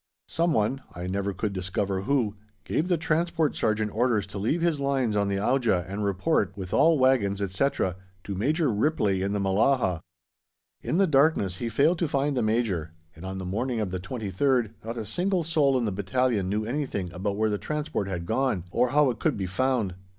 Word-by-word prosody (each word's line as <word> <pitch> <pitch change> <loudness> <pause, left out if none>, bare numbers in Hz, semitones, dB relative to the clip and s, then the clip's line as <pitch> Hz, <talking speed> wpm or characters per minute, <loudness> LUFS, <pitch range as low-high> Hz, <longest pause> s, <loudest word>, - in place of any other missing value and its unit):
Someone 135 -6 +1
(I 90 - -5
never 100 +2 -1
could 100 +2 -3
discover 95 +1 -2
who) 115 -2 0 0.3
gave 160 - -1
the 180 -2 +2
Transport 160 -1 0
Sergeant 110 -1 0
orders 115 -3 +2
to 100 0 -7
leave 145 - 0
his 165 -4 +1
lines 135 -5 0
on 100 -1 +2
the 100 - 0
Auja 110 -4 +1
and 100 +2 -4
report, 100 - 0
with 95 -2 -6
all 165 0 +5
wagons, 125 -7 +2
etc., 95 -1 0 0.3
to 100 - -5
Major 145 - +1
Ripley 105 -5 +1
in 100 +1 -1
the 105 - 0
Mellahah. 100 -1 +2 0.8
In - - -1
the 195 - +5
darkness 135 - +2
he 120 - -3
failed 155 +8 +2
to 170 - +1
find 140 0 0
the 125 - +1
Major, 110 -8 0 0.2
and 80 - -12
on 95 0 -5
the 95 - -5
morning 115 +6 -2
of 105 -4 -2
the 95 - -3
23rd 110 +3 0
not 115 +2 -5
a 110 - -4
single 180 - 0
soul 150 -4 +2
in 120 - 0
the 105 - -1
battalion 100 +1 0
knew 105 +2 -1
anything 115 - -3
about 100 +3 -2
where 110 0 +1
the 105 - -1
Transport 150 -9 -3
had 90 -3 -4
gone, 110 -3 0
or 125 - +2
how 145 0 +4
it 120 - -8
could - - 0
be 95 - -2
found. 110 +1 0
110 Hz, 200 wpm, -26 LUFS, 100-140 Hz, 0.8 s, all